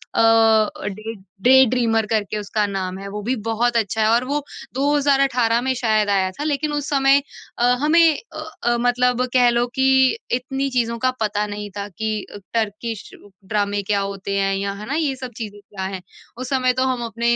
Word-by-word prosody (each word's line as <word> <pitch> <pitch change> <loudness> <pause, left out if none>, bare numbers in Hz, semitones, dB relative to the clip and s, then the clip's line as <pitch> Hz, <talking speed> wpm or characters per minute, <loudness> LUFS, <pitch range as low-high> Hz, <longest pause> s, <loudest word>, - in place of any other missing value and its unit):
अ - - +2
अ, 225 -2 +3
day 215 +3 -5 0.3
day 265 +3 +7
dreamer 225 -3 +1
करके 215 -1 -1
उसका 210 +1 -1
नाम 190 -2 -4
है। 200 - -7
वो 210 +1 -5
भी 255 +4 0
बहुत 235 +1 +1
अच्छा 220 0 0
है 215 - +3
और 235 +2 +3
वो 290 +3 -1 0.3
2018 275 -4 +2
में 260 - +2
शायद 215 -4 +1
आया 190 -1 +1
था। 290 - -6
लेकिन 300 0 -1
उस 290 -1 -2
समय 275 0 +4 0.4
अ, - - 0 0.2
हमें 315 +3 +4 0.3
अ 310 0 -6 0.2
अ, 240 0 +2
मतलब 250 +1 +2
कह 245 -1 +5
लो 240 0 +2
कि 265 0 +2 0.5
इतनी 270 +2 -1
चीज़ों 235 -2 0
का 255 - +4
पता 210 0 0
नहीं 205 0 -6
था 200 0 -4
कि 220 +3 -3
अ, - - -11 0.2
टर्किश 220 0 -3 0.4
ड्रामे 205 0 -1
क्या 200 +1 0
होते 195 0 -3
हैं, 195 0 +1
या 200 0 -2
है - - -6
ना, 285 - -2
ये 295 -4 0
सब 255 -1 -7
चीज़ें 205 -3 -7
क्या 200 -1 -8
हैं। 185 - -7 0.4
उस 255 0 -5
समय 255 -2 +2
तो - - +3
हम 240 -1 -4
अपने 235 +1 0
230 Hz, 200 wpm, -21 LUFS, 205-255 Hz, 0.5 s, day